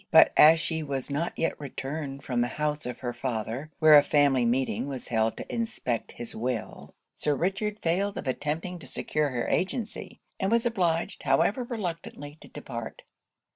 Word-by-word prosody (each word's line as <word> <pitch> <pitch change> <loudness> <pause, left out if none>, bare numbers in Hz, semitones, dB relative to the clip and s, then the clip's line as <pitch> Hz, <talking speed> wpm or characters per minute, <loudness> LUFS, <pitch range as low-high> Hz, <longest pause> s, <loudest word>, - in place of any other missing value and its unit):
But - - +7
as 160 +2 +8
she 160 0 -2
was 140 -2 -4
not 160 +5 -1
yet 165 - -1
returned 140 0 -5
from 125 -2 0
the 120 - +2
house 150 +1 -2
of 125 - -6
her 120 -2 -3
father, 120 +4 -3
where 155 -1 +8
a 145 - +10
family 140 -3 +3
meeting 130 +3 0
was 135 -3 -6
held 110 -2 +1
to - - -6
inspect 220 - -2
his 120 - -6
will, 120 -1 -4 0.2
Sir 150 -1 0
Richard 195 +6 -1
failed 195 +4 0
of - - -5
attempting 155 +7 -2
to - - -11
secure 150 -1 -1
her 120 -3 -2
agency; 215 +4 -2 0.2
and 195 +1 0
was 235 +1 +3
obliged, 175 -8 0
however 245 +5 +2
reluctantly, 170 - -5
to - - -12
depart. - - -7
150 Hz, 175 wpm, -28 LUFS, 130-175 Hz, 0.2 s, a